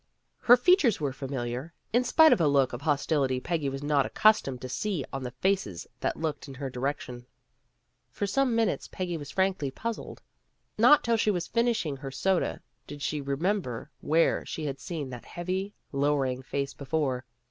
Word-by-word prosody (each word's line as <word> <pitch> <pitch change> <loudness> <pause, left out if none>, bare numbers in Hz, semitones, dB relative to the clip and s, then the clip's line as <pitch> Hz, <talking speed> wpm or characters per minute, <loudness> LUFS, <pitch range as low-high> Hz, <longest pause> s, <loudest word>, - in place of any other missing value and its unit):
Her 245 +1 +7
features 290 - +4
were 140 -3 -1
familiar, 130 +3 -4 0.2
in 245 +2 +4
spite 315 +3 +6
of 225 - +1
a 155 - +4
look 140 -3 +3
of 120 - -5
hostility 140 -3 +1
Peggy 160 -1 -1
was 135 +1 -5
not 145 -1 +3
accustomed 165 -12 +3
to 130 - -5
see 165 +3 -2
on 135 - -3
the 125 - -4
faces 125 - -1
that - - -1
looked 155 -3 -3
in 135 - -9
her 135 0 -5
direction. 125 -2 -4 0.8
For 205 - -3
some 245 +4 +1
minutes 225 -4 0
Peggy 180 -2 -4
was 145 -3 -7
frankly 190 -7 0
puzzled. 230 - -6 0.5
Not 295 - +6
till 230 0 +2
she 215 - +2
was 175 -4 0
finishing 230 - 0
her 135 0 -6
soda 175 +8 0 0.2
did 145 -1 -8
she 150 -1 -1
remember 140 - -2
where 160 +4 +2
she 155 - -5
had 140 -2 -4
seen 145 -4 -5
that 120 -2 -8
heavy, 185 +3 -4 0.2
lowering 140 -2 +1
face 140 +1 -3
before. 135 -3 -1
150 Hz, 175 wpm, -28 LUFS, 135-195 Hz, 0.8 s, Her